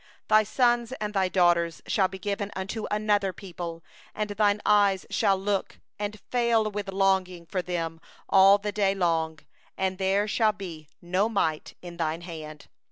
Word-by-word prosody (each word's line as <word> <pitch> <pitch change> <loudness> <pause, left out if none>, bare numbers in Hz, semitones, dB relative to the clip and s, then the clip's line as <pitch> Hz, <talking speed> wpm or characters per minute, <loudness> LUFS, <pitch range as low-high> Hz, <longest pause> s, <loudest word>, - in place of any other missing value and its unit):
32Thy 215 -1 +5
sons 240 0 +2
and 210 -4 -4
thy 190 -2 +1
daughters 175 -3 +2
shall 190 -2 +2
be 190 - -8
given 200 +1 -3
unto 195 +4 -4
another 210 -2 +1
people, 170 -3 -7 0.3
and 210 -1 -2
thine 205 0 +2
eyes 200 -2 +3
shall 200 -3 +2
look, 195 0 -2 0.2
and 210 0 -4
fail 235 -3 +2
with 205 -1 -4
longing 190 -3 +1
for 185 +2 -2
them 165 -2 -4 0.3
all 195 +1 +7
the 205 0 -4
day; 200 -1 +1 0.8
and 190 0 -1
there 195 +2 +1
shall 215 0 +2
be 165 -7 -9
nought 185 -3 0
in 175 -1 -9
the 170 - 0
power 155 0 0
of - - -10
thy 175 - -11
hand. 155 -3 -9
195 Hz, 165 wpm, -27 LUFS, 175-210 Hz, 0.8 s, all